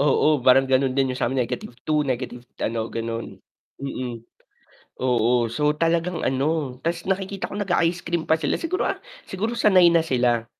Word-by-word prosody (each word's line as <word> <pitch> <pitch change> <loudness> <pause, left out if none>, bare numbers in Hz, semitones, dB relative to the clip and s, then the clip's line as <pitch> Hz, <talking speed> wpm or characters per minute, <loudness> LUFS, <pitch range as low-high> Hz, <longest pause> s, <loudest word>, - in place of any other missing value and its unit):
Oo, 145 +1 +3
parang 130 +1 +5
ganun 130 0 +1
din 135 -1 +2
yung 125 - -6
samin 125 +1 +1
negative 120 0 -6
2, 155 -1 +2
negative 125 -3 -3 0.2
ano, 115 0 -2
ganon, 115 0 -5 0.4
mm, 125 -4 -5 0.8
oo, 120 -1 +2
so 150 +5 +1
talagang 165 +2 0
ano 135 0 -1
tas 170 0 -1
nakikita 195 0 -2
ko 205 - -6
naga-ice 175 -3 0
cream 170 -1 -2
pa 160 - +5
sila - - -1
siguro, 355 +3 -1
ah, - - -2 0.2
siguro 220 +5 -3
sanay 185 -6 +6
na 165 -1 +3
sila. 120 -5 +1
140 Hz, 165 wpm, -23 LUFS, 125-170 Hz, 0.8 s, sanay